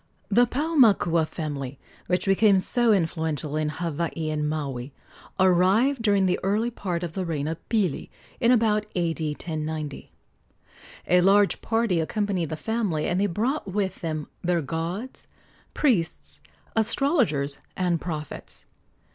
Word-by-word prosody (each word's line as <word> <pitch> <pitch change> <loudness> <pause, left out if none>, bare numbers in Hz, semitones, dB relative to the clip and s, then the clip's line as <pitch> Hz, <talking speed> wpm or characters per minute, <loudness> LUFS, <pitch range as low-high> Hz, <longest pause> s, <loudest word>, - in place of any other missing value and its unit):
The 240 +4 +4
Paumakua 230 - +3
family, 140 -5 -5 0.3
which 180 0 0
became 195 0 +4
so 240 +4 +2
influential 160 -5 0
in 155 -1 0
Hawaii 165 -1 -3
and 150 -1 -1
Maui, 140 -4 -4 0.5
arrived 190 +9 +4
during 200 -3 +3
the 180 - +1
early 215 +5 0
part 180 -6 -3
of 170 -2 -4
the 190 - -2
reign 155 -4 -2
of 160 0 -3
Pili, 200 -10 0 0.3
in 240 -1 +4
about 215 -3 +2
A.D. 170 -2 -1
1090. 155 -2 -5 1.0
A 180 0 +4
large 200 +2 +4
party 225 -6 +1
accompanied 185 -1 -1
the 155 - -4
family, 205 -7 -1
and 180 +2 0
they 205 - +3
brought 215 - -1
with 195 -1 -2
them 155 -3 -3 0.2
their 175 -2 +1
gods, 170 - -4 0.5
priests, 205 - 0 0.4
astrologers 225 - +1 0.2
and 175 -3 0
prophets. 155 -4 -6
180 Hz, 130 wpm, -25 LUFS, 155-215 Hz, 1.0 s, The